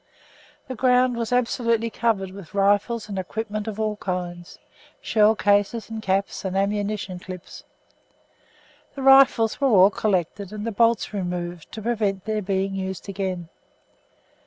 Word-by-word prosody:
The 260 Hz, -, -4 dB
ground 250 Hz, +1 st, +3 dB
was 230 Hz, -1 st, -3 dB
absolutely 230 Hz, -2 st, +1 dB
covered 210 Hz, -5 st, 0 dB
with 195 Hz, -1 st, -12 dB
rifles 205 Hz, +3 st, +2 dB
and 200 Hz, -2 st, -4 dB
equipment 215 Hz, +3 st, -4 dB
of 220 Hz, -1 st, -5 dB
all 215 Hz, -1 st, -1 dB
kinds, 175 Hz, -3 st, -5 dB, 0.4 s
shell 215 Hz, 0 st, +3 dB
cases 205 Hz, +3 st, +1 dB
and 220 Hz, -1 st, -5 dB
caps, 195 Hz, -1 st, -1 dB
and 190 Hz, 0 st, -2 dB
ammunition 200 Hz, -2 st, -1 dB
clips. 180 Hz, 0 st, -10 dB, 1.3 s
The 275 Hz, -, -5 dB
rifles 270 Hz, -3 st, +5 dB
were 275 Hz, -, +4 dB
all 195 Hz, -3 st, +6 dB
collected 195 Hz, -1 st, -1 dB
and 210 Hz, 0 st, -6 dB
the 230 Hz, -, -2 dB
bolts 230 Hz, 0 st, +2 dB
removed 175 Hz, -3 st, -4 dB
to 220 Hz, -, -7 dB
prevent 205 Hz, -5 st, -1 dB
their 215 Hz, -1 st, -1 dB
being 195 Hz, 0 st, -1 dB
used 190 Hz, 0 st, -5 dB
again. 185 Hz, -3 st, -4 dB
205 Hz, 140 wpm, -24 LUFS, 190-225 Hz, 1.3 s, all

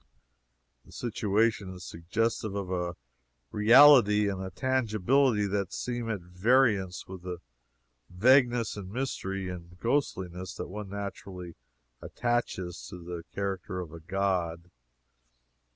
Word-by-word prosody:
The -, -, -19 dB
situation 105 Hz, -3 st, 0 dB
is 90 Hz, -, -10 dB
suggestive 105 Hz, +5 st, -2 dB
of 100 Hz, -2 st, -3 dB
a 90 Hz, -1 st, -2 dB, 0.6 s
reality 110 Hz, -2 st, +7 dB
and 95 Hz, -1 st, -4 dB
a 95 Hz, -, -4 dB
tangibility 120 Hz, +1 st, +2 dB
that 100 Hz, -1 st, -1 dB
seem 120 Hz, -2 st, -3 dB
at 105 Hz, -5 st, -2 dB
variance 95 Hz, +1 st, +1 dB
with 95 Hz, -1 st, -8 dB
the 90 Hz, 0 st, -5 dB, 0.7 s
vagueness 120 Hz, +4 st, +3 dB
and 95 Hz, -2 st, -8 dB
mystery 95 Hz, -6 st, -3 dB
and 90 Hz, 0 st, -9 dB
ghostliness 95 Hz, -8 st, -2 dB
that -, -, -6 dB
one 105 Hz, +1 st, -6 dB
naturally 95 Hz, -3 st, -7 dB, 0.5 s
attaches 120 Hz, -8 st, -2 dB
to 90 Hz, -, -8 dB
the 85 Hz, -1 st, -7 dB
character 95 Hz, -2 st, -3 dB
of 85 Hz, -3 st, -7 dB
a 85 Hz, -, -8 dB
god. 90 Hz, -1 st, -2 dB
100 Hz, 120 wpm, -29 LUFS, 90-115 Hz, 0.7 s, reality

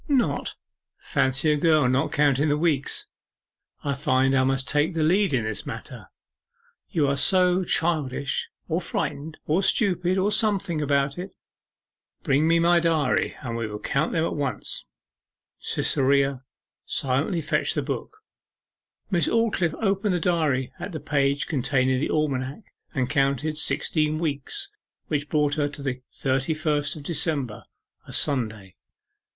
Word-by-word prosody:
'Not? 245 Hz, -, 0 dB, 0.4 s
Fancy 135 Hz, +4 st, +1 dB
a -, -, +3 dB
girl 155 Hz, -3 st, +3 dB
not 130 Hz, +2 st, +1 dB
counting 145 Hz, 0 st, +2 dB
the 145 Hz, -, +2 dB
weeks! 150 Hz, -4 st, +1 dB, 0.8 s
I 140 Hz, -, 0 dB
find 135 Hz, -2 st, +2 dB
I 130 Hz, -1 st, +4 dB
must 135 Hz, 0 st, 0 dB
take 150 Hz, +4 st, +1 dB
the 160 Hz, -, +1 dB
lead 190 Hz, +4 st, +3 dB
in 130 Hz, -4 st, +1 dB
this 110 Hz, -1 st, -3 dB
matter -, -, -7 dB, 0.8 s
you 155 Hz, -4 st, +1 dB
are 140 Hz, -, +1 dB
so 180 Hz, +4 st, +4 dB
childish, 150 Hz, -6 st, 0 dB, 0.2 s
or 170 Hz, +2 st, -1 dB
frightened, 155 Hz, -1 st, -3 dB
or 160 Hz, +5 st, +2 dB
stupid, 185 Hz, -3 st, +2 dB
or 195 Hz, +2 st, +2 dB
something, 200 Hz, -7 st, +2 dB
about 140 Hz, +1 st, 0 dB
it. 185 Hz, +2 st, -7 dB, 0.9 s
Bring 140 Hz, +3 st, +2 dB
me 165 Hz, 0 st, +4 dB
my 170 Hz, +1 st, +4 dB
diary, 160 Hz, -5 st, +1 dB
and 115 Hz, -3 st, -4 dB
we 115 Hz, -1 st, -2 dB
will 105 Hz, -1 st, -6 dB
count 140 Hz, +8 st, -1 dB
them 165 Hz, 0 st, +1 dB
at -, -, -2 dB
once.' 140 Hz, -3 st, -3 dB, 0.7 s
Cytherea 135 Hz, -1 st, +1 dB, 0.4 s
silently 140 Hz, +7 st, 0 dB
fetched -, -, 0 dB
the -, -, 0 dB
book. 430 Hz, 0 st, -6 dB, 0.9 s
Miss 175 Hz, -3 st, +2 dB
Aldclyffe 215 Hz, -8 st, +1 dB
opened 195 Hz, -1 st, +1 dB
the -, -, 0 dB
diary 155 Hz, -7 st, 0 dB
at 200 Hz, -, -6 dB
the 155 Hz, -, -4 dB
page 140 Hz, -1 st, 0 dB
containing 130 Hz, -2 st, +1 dB
the 145 Hz, -, -1 dB
almanac, 140 Hz, -, -2 dB, 0.2 s
and 130 Hz, -2 st, +1 dB
counted 140 Hz, +2 st, 0 dB
sixteen 155 Hz, 0 st, 0 dB
weeks, 160 Hz, -, -2 dB, 0.4 s
which 145 Hz, -1 st, -1 dB
brought 150 Hz, -1 st, +2 dB
her 145 Hz, -1 st, 0 dB
to 140 Hz, 0 st, -9 dB
the 130 Hz, -2 st, -3 dB
thirty 135 Hz, +4 st, -1 dB
first 150 Hz, -1 st, 0 dB
of 150 Hz, -, -9 dB
December 145 Hz, -7 st, -1 dB, 0.4 s
a -, -, -9 dB
Sunday. 110 Hz, -9 st, 0 dB
150 Hz, 145 wpm, -25 LUFS, 135-170 Hz, 0.9 s, I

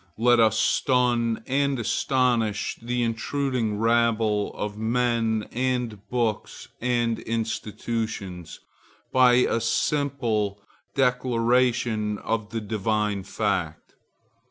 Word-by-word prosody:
Let 120 Hz, +1 st, +4 dB
us 110 Hz, -1 st, +4 dB
stun 120 Hz, -3 st, +1 dB
and 140 Hz, +1 st, +1 dB
astonish 120 Hz, -2 st, 0 dB
the 120 Hz, +1 st, -1 dB
intruding 115 Hz, -1 st, -1 dB
rabble 115 Hz, -2 st, +2 dB
of 105 Hz, 0 st, -4 dB
men 115 Hz, -1 st, 0 dB
and 125 Hz, -4 st, -2 dB
books 115 Hz, -4 st, -2 dB
and 120 Hz, -2 st, 0 dB
institutions, 110 Hz, -5 st, -4 dB, 0.5 s
by 125 Hz, -1 st, +5 dB
a 120 Hz, -2 st, +2 dB
simple 115 Hz, -6 st, 0 dB, 0.4 s
declaration 120 Hz, -4 st, +1 dB
of 110 Hz, -1 st, -3 dB
the 115 Hz, 0 st, -3 dB
divine 105 Hz, -1 st, -1 dB
fact. 95 Hz, -5 st, -3 dB
115 Hz, 90 wpm, -25 LUFS, 110-125 Hz, 0.5 s, by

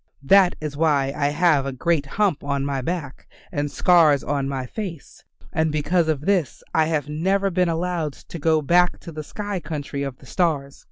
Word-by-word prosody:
That 190 Hz, +4 st, +5 dB
is 150 Hz, -2 st, -5 dB
why 145 Hz, -3 st, +2 dB
I 145 Hz, -, +1 dB
have 150 Hz, -2 st, +2 dB
a -, -, -2 dB
great 145 Hz, +2 st, 0 dB
hump 195 Hz, 0 st, 0 dB
on 140 Hz, -1 st, -1 dB
my 140 Hz, -1 st, -2 dB
back 155 Hz, -2 st, -5 dB, 0.2 s
and 145 Hz, 0 st, -2 dB
scars 155 Hz, -4 st, +4 dB
on 140 Hz, -1 st, -1 dB
my 135 Hz, -2 st, -3 dB
face, 170 Hz, -, -7 dB, 0.3 s
and 160 Hz, -3 st, +1 dB
because 160 Hz, +3 st, +1 dB
of 155 Hz, -3 st, 0 dB
this 180 Hz, -2 st, 0 dB
I 160 Hz, -, +3 dB
have 155 Hz, -2 st, -1 dB
never 190 Hz, +6 st, 0 dB
been 180 Hz, 0 st, +2 dB
allowed 165 Hz, -2 st, -1 dB
to 170 Hz, -, -10 dB
go 155 Hz, 0 st, +2 dB
back 175 Hz, +4 st, +3 dB
to 170 Hz, -, -9 dB
the 155 Hz, -1 st, -6 dB
sky 205 Hz, +4 st, -4 dB
country 145 Hz, -4 st, -5 dB
of 135 Hz, -2 st, -4 dB
the -, -, -17 dB
stars. 140 Hz, -3 st, -1 dB
155 Hz, 190 wpm, -23 LUFS, 140-175 Hz, 0.3 s, That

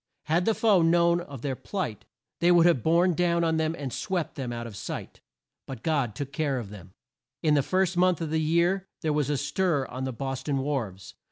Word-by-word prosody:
Had 170 Hz, +3 st, +1 dB
the 225 Hz, -, +2 dB
foe 210 Hz, -6 st, +4 dB
known 170 Hz, +1 st, +4 dB
of 140 Hz, -7 st, -9 dB
their 135 Hz, -2 st, -1 dB
plight, 125 Hz, -, -4 dB, 0.3 s
they 175 Hz, +1 st, +4 dB
would 170 Hz, -1 st, +6 dB
have 170 Hz, -8 st, +4 dB
borne 170 Hz, +5 st, +3 dB
down 170 Hz, 0 st, +1 dB
on 160 Hz, -1 st, +1 dB
them 160 Hz, +1 st, 0 dB
and 135 Hz, -4 st, -5 dB
swept 180 Hz, -4 st, -2 dB
them 130 Hz, -4 st, -4 dB
out 120 Hz, 0 st, -5 dB
of 115 Hz, -3 st, -8 dB
sight. -, -, -7 dB, 0.5 s
But 130 Hz, -4 st, -8 dB
God 140 Hz, -9 st, 0 dB
took 140 Hz, +1 st, -5 dB
care 140 Hz, -2 st, 0 dB
of 110 Hz, -5 st, -6 dB
them. 95 Hz, -2 st, -12 dB, 0.5 s
In 155 Hz, -2 st, +4 dB
the 145 Hz, -, +4 dB
first 185 Hz, +4 st, +1 dB
month 180 Hz, -1 st, +3 dB
of 160 Hz, -2 st, -3 dB
the 160 Hz, 0 st, +1 dB
year 170 Hz, +4 st, +1 dB
there 155 Hz, -1 st, 0 dB
was 150 Hz, -2 st, 0 dB
a 145 Hz, -, +1 dB
stir 150 Hz, 0 st, 0 dB
on 130 Hz, +1 st, -6 dB
the 130 Hz, -, -2 dB
Bos 135 Hz, +2 st, -4 dB
ton 140 Hz, 0 st, -1 dB
wharves. 130 Hz, -9 st, -3 dB
155 Hz, 225 wpm, -27 LUFS, 130-170 Hz, 0.5 s, would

